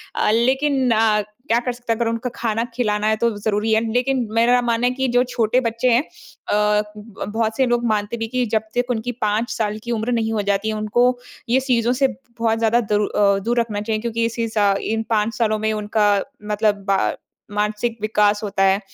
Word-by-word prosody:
अ, -, -, +1 dB
लेकिन 260 Hz, +3 st, +2 dB
अ, 215 Hz, -1 st, +3 dB, 0.2 s
क्या 230 Hz, +1 st, +3 dB
कर 250 Hz, -, 0 dB
सकते 240 Hz, -1 st, -2 dB
है -, -, -5 dB
अगर 235 Hz, 0 st, 0 dB
उनका 230 Hz, +2 st, -2 dB
खाना 225 Hz, 0 st, -1 dB
खिलाना 210 Hz, -3 st, 0 dB
है 220 Hz, -, +3 dB
तो 235 Hz, -, +4 dB
ज़रूरी 210 Hz, +1 st, -1 dB
है। 220 Hz, -, +3 dB
लेकिन 250 Hz, 0 st, +1 dB
मेरा 240 Hz, +2 st, +4 dB
मानना 235 Hz, 0 st, +1 dB
है 250 Hz, -, +1 dB
कि 265 Hz, +1 st, -1 dB
जो 245 Hz, -, +5 dB
छोटे 235 Hz, 0 st, +1 dB
बच्चे 230 Hz, +1 st, -1 dB
हैं, 235 Hz, -, +4 dB, 0.5 s
अ, 210 Hz, 0 st, +2 dB
उब 210 Hz, -1 st, -13 dB
अ, -, -, -1 dB
बहुत 220 Hz, +1 st, -1 dB
से 265 Hz, -, +3 dB
लोग 240 Hz, -1 st, +1 dB
मानते 215 Hz, +1 st, -1 dB
भी 225 Hz, 0 st, -3 dB
कि 250 Hz, +1 st, -1 dB
जब 220 Hz, -, +3 dB
तक 245 Hz, +1 st, 0 dB
उनकी 240 Hz, +1 st, -2 dB
5 215 Hz, +3 st, 0 dB
साल 215 Hz, -2 st, -2 dB
की 240 Hz, -, -4 dB
उम्र 230 Hz, +2 st, -1 dB
नहीं 225 Hz, -2 st, 0 dB
हो 210 Hz, -, 0 dB
जाती 200 Hz, +2 st, 0 dB
है 215 Hz, -, -2 dB
उनको 240 Hz, +4 st, +2 dB, 0.3 s
ये 255 Hz, -, +4 dB
चीज़ों 245 Hz, -2 st, +1 dB
से 270 Hz, +2 st, +2 dB, 0.3 s
बहुत 225 Hz, -1 st, +1 dB
ज़्यादा 225 Hz, +1 st, +3 dB
दूर 210 Hz, -1 st, 0 dB
अ, 200 Hz, -1 st, +2 dB
दूर 235 Hz, +4 st, 0 dB
रखना 215 Hz, -3 st, -2 dB
चाहिए 215 Hz, 0 st, -2 dB
क्योंकि 230 Hz, 0 st, -1 dB
इसी 230 Hz, 0 st, -2 dB
सा 205 Hz, -2 st, +2 dB
इन 225 Hz, 0 st, -1 dB
5 220 Hz, 0 st, +1 dB
सालों 215 Hz, -2 st, +1 dB
में 220 Hz, 0 st, 0 dB
उनका 210 Hz, -1 st, +1 dB, 0.3 s
मतलब 205 Hz, -2 st, 0 dB, 0.7 s
मानसिक 210 Hz, +3 st, -1 dB
विकास 210 Hz, -1 st, +2 dB
होता 195 Hz, -2 st, 0 dB
है। 195 Hz, 0 st, +4 dB
225 Hz, 215 wpm, -21 LUFS, 210-240 Hz, 0.7 s, जो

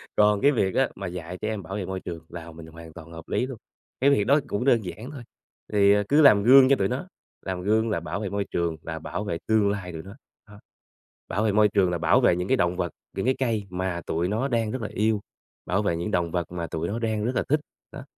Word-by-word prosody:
Còn 105 Hz, -1 st, +4 dB
cái 145 Hz, -, +5 dB
việc 95 Hz, -8 st, 0 dB
á 135 Hz, -, +3 dB
mà 100 Hz, -2 st, -5 dB
dạy 90 Hz, 0 st, -6 dB
trẻ 110 Hz, -, -2 dB
em 105 Hz, -3 st, -4 dB
bảo 95 Hz, -, -6 dB
vệ 100 Hz, -3 st, -3 dB
môi 95 Hz, 0 st, -4 dB
trường 85 Hz, -3 st, -8 dB
là 85 Hz, -1 st, -8 dB
mình 80 Hz, 0 st, -11 dB
hoàn 80 Hz, 0 st, -12 dB
toàn 85 Hz, -1 st, -12 dB
hợp 80 Hz, 0 st, -10 dB
lý 125 Hz, -, 0 dB
luôn, 130 Hz, -3 st, -7 dB, 0.4 s
cái 140 Hz, -, +5 dB
việc 105 Hz, -8 st, +3 dB
đó 145 Hz, +3 st, +5 dB
cũng 105 Hz, +3 st, -2 dB
đơn 120 Hz, -5 st, +4 dB
giản 105 Hz, -, -7 dB
thôi, 130 Hz, -5 st, -9 dB, 0.5 s
thì, 100 Hz, 0 st, +5 dB
à, 105 Hz, 0 st, +2 dB
cứ 150 Hz, +2 st, +5 dB
làm 105 Hz, -8 st, +7 dB
gương 130 Hz, +2 st, +8 dB
cho 140 Hz, -, +6 dB
tụi 95 Hz, -5 st, 0 dB
nó, 135 Hz, -, -4 dB, 0.4 s
làm 95 Hz, -1 st, -3 dB
gương 110 Hz, +3 st, +1 dB
là 100 Hz, -, 0 dB
bảo 85 Hz, +4 st, -4 dB
vệ 100 Hz, -3 st, -3 dB
môi 100 Hz, 0 st, -2 dB
trường 85 Hz, -2 st, -1 dB
là 80 Hz, -1 st, -6 dB
bảo 105 Hz, -, -5 dB
vệ 85 Hz, -5 st, -3 dB
tương 110 Hz, -2 st, +3 dB
lai 95 Hz, -3 st, -3 dB
tụi 80 Hz, -1 st, -7 dB
nó, 100 Hz, +4 st, -11 dB, 0.3 s
đó. 105 Hz, 0 st, -14 dB, 0.7 s
Bảo 105 Hz, +5 st, 0 dB
vệ 110 Hz, -, +2 dB
môi 105 Hz, +1 st, +5 dB
trường 95 Hz, -3 st, +2 dB
là 85 Hz, -, -1 dB
bảo -, -, +3 dB
vệ 85 Hz, -, +4 dB
những 90 Hz, +1 st, -3 dB
cái 130 Hz, -, +2 dB
động 90 Hz, 0 st, +1 dB
vật, 90 Hz, -2 st, -2 dB, 0.3 s
những 95 Hz, -, -1 dB
cái 130 Hz, -, +2 dB
cây 115 Hz, -6 st, 0 dB
mà 90 Hz, -1 st, -3 dB
tụi 85 Hz, +2 st, -1 dB
nó 110 Hz, +7 st, -1 dB
đang 115 Hz, -4 st, 0 dB
rất 130 Hz, -, -4 dB
là 105 Hz, -, -4 dB
yêu, 110 Hz, 0 st, +1 dB, 0.5 s
bảo 95 Hz, +5 st, 0 dB
vệ 85 Hz, -5 st, 0 dB
những 85 Hz, +5 st, -3 dB
động 85 Hz, -2 st, 0 dB
vật 90 Hz, -2 st, -2 dB
mà 85 Hz, -2 st, -4 dB
tụi 80 Hz, +1 st, -3 dB
nó 110 Hz, +5 st, -3 dB
đang 110 Hz, -2 st, -1 dB
rất 125 Hz, 0 st, -1 dB
là -, -, +1 dB
thích, 150 Hz, +1 st, +3 dB, 0.3 s
đó. -, -, -8 dB
100 Hz, 275 wpm, -25 LUFS, 85-110 Hz, 0.7 s, gương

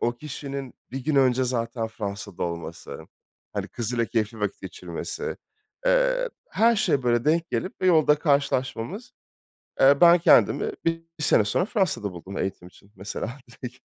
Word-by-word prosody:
o 120 Hz, -, +1 dB
kişinin 140 Hz, -2 st, -6 dB, 0.2 s
1 130 Hz, +1 st, -5 dB
gün 155 Hz, -2 st, +1 dB
önce 130 Hz, -1 st, +4 dB
zaten 115 Hz, -2 st, -2 dB
Fransa'da 100 Hz, -3 st, -6 dB
olması, 85 Hz, -4 st, -5 dB, 0.5 s
hani, -, -, -3 dB
kızıyla 115 Hz, 0 st, -2 dB
keyifli 110 Hz, -1 st, -2 dB
vakit 105 Hz, -1 st, -2 dB
geçirmesi, 95 Hz, -, -5 dB, 0.5 s
eee, -, -, +3 dB, 0.2 s
her 230 Hz, +1 st, +4 dB
şeye 140 Hz, -9 st, +2 dB
böyle 120 Hz, -1 st, +2 dB
denk 165 Hz, +2 st, +1 dB
gelip 185 Hz, -, -3 dB
ve -, -, +3 dB
yolda 155 Hz, -4 st, +5 dB
karşılaşmamız. 140 Hz, -, -1 dB, 0.7 s
Eee, 140 Hz, +1 st, +6 dB
ben 175 Hz, 0 st, +8 dB
kendimi 430 Hz, -, +4 dB
bir 165 Hz, 0 st, 0 dB, 0.2 s
bir -, -, -5 dB
sene 105 Hz, -, +4 dB
sonra 175 Hz, -, +1 dB
Fransa'da 190 Hz, -, -1 dB
buldum 95 Hz, +3 st, -8 dB
eğitim 90 Hz, -2 st, -4 dB
için 100 Hz, +2 st, -22 dB
mesela 110 Hz, +6 st, -5 dB
direkt. 125 Hz, +1 st, -9 dB
130 Hz, 150 wpm, -25 LUFS, 110-165 Hz, 0.7 s, ben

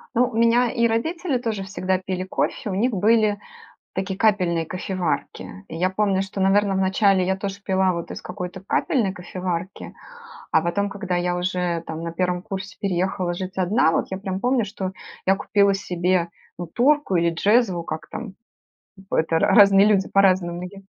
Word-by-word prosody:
Ну, 245 Hz, +1 st, +4 dB
у -, -, -9 dB
меня 235 Hz, +1 st, +4 dB
и 235 Hz, -2 st, +2 dB
родители 300 Hz, +6 st, -1 dB
тоже 220 Hz, -5 st, -3 dB
всегда 190 Hz, -1 st, -1 dB
пили 185 Hz, 0 st, -4 dB
кофе, 190 Hz, +2 st, -2 dB
у 190 Hz, -, -2 dB
них 235 Hz, +6 st, +1 dB
были 210 Hz, 0 st, +2 dB, 0.6 s
такие 190 Hz, 0 st, -3 dB
капельные 180 Hz, -6 st, +2 dB
кофеварки. 180 Hz, -, -4 dB
Я 170 Hz, +3 st, 0 dB
помню, 190 Hz, 0 st, +1 dB
что, 195 Hz, 0 st, -4 dB
наверно, 195 Hz, +1 st, +3 dB
вначале 190 Hz, 0 st, +3 dB
я 190 Hz, +1 st, 0 dB
тоже 195 Hz, +1 st, -5 dB
пила 190 Hz, -1 st, +2 dB
вот 170 Hz, -1 st, -5 dB
из -, -, -6 dB
какой-то 180 Hz, 0 st, -6 dB
капельной 205 Hz, 0 st, 0 dB
кофеварки. 180 Hz, 0 st, -5 dB, 0.6 s
А 160 Hz, -, +3 dB
потом, 200 Hz, +4 st, 0 dB
когда 195 Hz, -2 st, -4 dB
я 175 Hz, 0 st, 0 dB
уже, 180 Hz, -2 st, -1 dB
там, 160 Hz, 0 st, -5 dB
на 170 Hz, -, -3 dB
1 180 Hz, 0 st, -1 dB
курсе 195 Hz, -1 st, -6 dB
переехала 185 Hz, -2 st, -1 dB
жить 185 Hz, +1 st, -6 dB
одна, 190 Hz, 0 st, +2 dB
вот -, -, 0 dB
я 190 Hz, -, -3 dB
прям 190 Hz, -1 st, -4 dB
помню, 250 Hz, -2 st, +2 dB
что 190 Hz, -2 st, -5 dB, 0.3 s
я 195 Hz, -, +4 dB
купила 200 Hz, 0 st, +2 dB
себе, 180 Hz, -2 st, 0 dB, 0.3 s
ну, 175 Hz, -, -4 dB
турку 255 Hz, -, +2 dB
или 170 Hz, 0 st, +2 dB
джезву- 190 Hz, 0 st, +2 dB
как 155 Hz, -1 st, -6 dB
там? 195 Hz, -, -7 dB, 0.8 s
П -, -, 0 dB
это 160 Hz, 0 st, +2 dB
ра -, -, +3 dB
разные 200 Hz, -2 st, +7 dB
люди 200 Hz, -3 st, +2 dB
по-разному 185 Hz, -3 st, +2 dB
её 195 Hz, +2 st, -9 dB
190 Hz, 175 wpm, -23 LUFS, 180-205 Hz, 0.8 s, разные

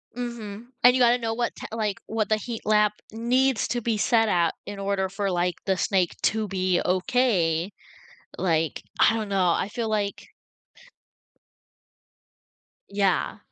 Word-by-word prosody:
Mhm. 235 Hz, -2 st, -6 dB, 0.2 s
And 245 Hz, +1 st, +7 dB
you 255 Hz, -, +2 dB
gotta 240 Hz, 0 st, +5 dB
know 225 Hz, -2 st, -2 dB
what, 235 Hz, +1 st, -2 dB
t -, -, -8 dB
like, 215 Hz, -3 st, -2 dB
what 220 Hz, -2 st, -2 dB
the 215 Hz, -, +3 dB
heat 225 Hz, +1 st, -6 dB
lamp 210 Hz, -1 st, +3 dB, 0.2 s
needs 245 Hz, +3 st, +1 dB
to 240 Hz, +2 st, -1 dB
be 225 Hz, -1 st, 0 dB
set 225 Hz, +1 st, +3 dB
at 170 Hz, -3 st, +2 dB
in 205 Hz, -, -7 dB
order 195 Hz, -1 st, -1 dB
for, 195 Hz, +1 st, -2 dB
like, 175 Hz, 0 st, 0 dB
the 190 Hz, -1 st, +1 dB
snake 185 Hz, -3 st, +1 dB
to 220 Hz, 0 st, +1 dB
be 185 Hz, -2 st, 0 dB
okay. 185 Hz, -4 st, +1 dB, 0.7 s
Like, 165 Hz, -4 st, 0 dB, 0.2 s
I -, -, +5 dB
don't 220 Hz, -2 st, -3 dB
know, 190 Hz, -3 st, +2 dB
I 175 Hz, -, 0 dB
feel 225 Hz, +1 st, -3 dB
like 205 Hz, -2 st, -2 dB, 2.6 s
Yeah. 200 Hz, +1 st, 0 dB
210 Hz, 150 wpm, -25 LUFS, 190-230 Hz, 2.6 s, And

